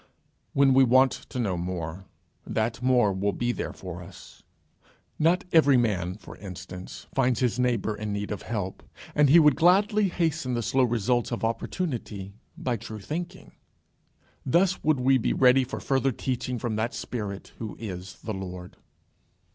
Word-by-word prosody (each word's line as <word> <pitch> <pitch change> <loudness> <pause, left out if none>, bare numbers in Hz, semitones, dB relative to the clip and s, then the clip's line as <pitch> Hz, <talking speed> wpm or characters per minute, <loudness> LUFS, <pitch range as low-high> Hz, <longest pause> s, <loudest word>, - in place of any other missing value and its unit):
When 140 -1 +5
we 135 +1 +6
want 130 +1 +5
to - - -8
know 105 -7 0
more, 85 0 -4 0.4
that 115 +2 -2
more 125 -5 +3
will 100 +2 0
be 120 0 0
there - - -4
for 90 -2 -8
us. 85 - -13 0.8
Not 170 +4 +3
every 145 -5 +6
man, 95 -7 0
for 110 - -12
instance, 90 -1 -9
finds 125 -3 +2
his 125 -1 +1
neighbour 120 -4 +1
in 105 0 -4
need 100 +1 -3
of 105 - -4
help, 100 -5 -4 0.3
and 150 -2 +4
he 160 - +8
would 150 -4 +6
gladly 200 +5 +4
hasten 160 -7 -1
the 120 - -1
slow 130 +3 +3
results 120 +1 0
of 120 - -3
opportunity 115 - -3 0.2
by 125 -2 -1
true 110 0 -8
thinking. 175 - -6 0.9
Thus 180 +7 +2
would 155 -3 +2
we 130 +1 +4
be - - 0
ready 130 0 +5
for 125 - -5
further 135 0 +1
teaching 125 0 -3
from 115 -2 -2
that 115 +2 -1
Spirit 100 -5 -5
who 110 -2 -5
is 95 -3 -7
the 110 - -3
Lord. 90 -2 -7
120 Hz, 165 wpm, -27 LUFS, 100-135 Hz, 0.9 s, he